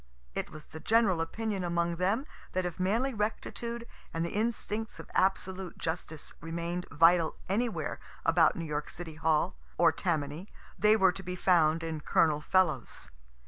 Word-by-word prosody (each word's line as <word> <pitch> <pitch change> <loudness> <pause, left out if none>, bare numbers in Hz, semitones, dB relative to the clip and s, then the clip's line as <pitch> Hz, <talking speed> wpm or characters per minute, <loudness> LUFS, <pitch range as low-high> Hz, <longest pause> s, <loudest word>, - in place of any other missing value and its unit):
It - - -3
was 155 -1 -10
the 160 - -10
general 210 -4 +3
opinion 205 +3 -2
among 170 -1 0
them 200 - +1 0.3
that 185 0 0
if 175 -1 -4
manly 230 +9 +1
rectitude 235 +2 -3 0.3
and 165 +1 -1
the 170 - -4
instincts 220 0 -2
of - - -10
absolute 190 -1 0
justice 160 -2 -4
remain'd 170 +2 -3
vital 165 +1 +4
anywhere 220 +4 -1 0.3
about - - +5
New 170 -4 -4
York 150 -1 -3
City 165 -2 -7
Hall, 155 - +1 0.2
or - - +6
Tammany, 160 +1 -2 0.3
they 215 +1 +5
were 190 -3 +5
to 190 - -7
be 180 -1 -5
found 165 -3 +3
in 160 -1 -3
Col. 150 -1 +3
Fellows. 185 0 0
180 Hz, 155 wpm, -30 LUFS, 165-205 Hz, 0.3 s, or